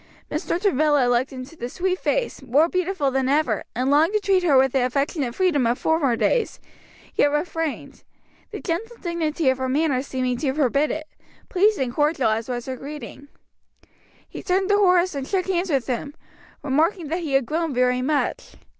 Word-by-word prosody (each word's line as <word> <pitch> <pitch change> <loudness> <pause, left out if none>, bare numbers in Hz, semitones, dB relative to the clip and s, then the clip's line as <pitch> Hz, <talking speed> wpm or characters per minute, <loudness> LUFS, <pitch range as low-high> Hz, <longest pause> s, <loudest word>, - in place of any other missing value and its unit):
Mr. 340 - -2
Travilla 300 -8 +2
looked 245 +2 +1
into 260 +4 -9
the 240 -5 -5
sweet 370 +5 -1
face, - - -1
more 270 +5 +3
beautiful 365 -5 -1
than 265 0 0
ever, 280 -7 +1
and 255 +3 0
longed 315 +7 +4
to 425 - +3
treat 390 -2 +2
her 310 -7 +4
with 265 0 +4
the 265 -1 +1
affectionate 275 0 -1
freedom 330 -10 +2
of 240 +1 +1
former 300 -7 +1
days, 475 - 0 0.5
yet - - +3
refrained; 315 0 -3 0.5
the - - -7
gentle 445 +7 -4
dignity 335 -4 -2
of 260 - -4
her 260 0 -1
manner 280 -1 +1
seeming 255 -2 -2
to 265 +1 -1
forbid 285 0 +2
it, 310 0 -4 0.4
pleased 415 +3 +3
and 255 -3 -1
cordial 295 -6 +1
as 225 +2 -2
was 240 -1 -3
her 260 -1 -5
greeting. 285 0 -9 1.0
He - - -8
turned 380 +1 0
to 410 - +4
Horace 365 -2 +3
and 275 -2 -4
shook 380 -2 0
hands 370 -1 -1
with 275 -5 +1
him, 280 +3 -4 0.5
remarking 310 +4 0
that 335 +3 -1
he 315 -5 -4
had 270 -2 +3
grown 320 +4 -1
very 250 0 +1
much. 290 +3 -1
295 Hz, 185 wpm, -23 LUFS, 260-345 Hz, 1.0 s, longed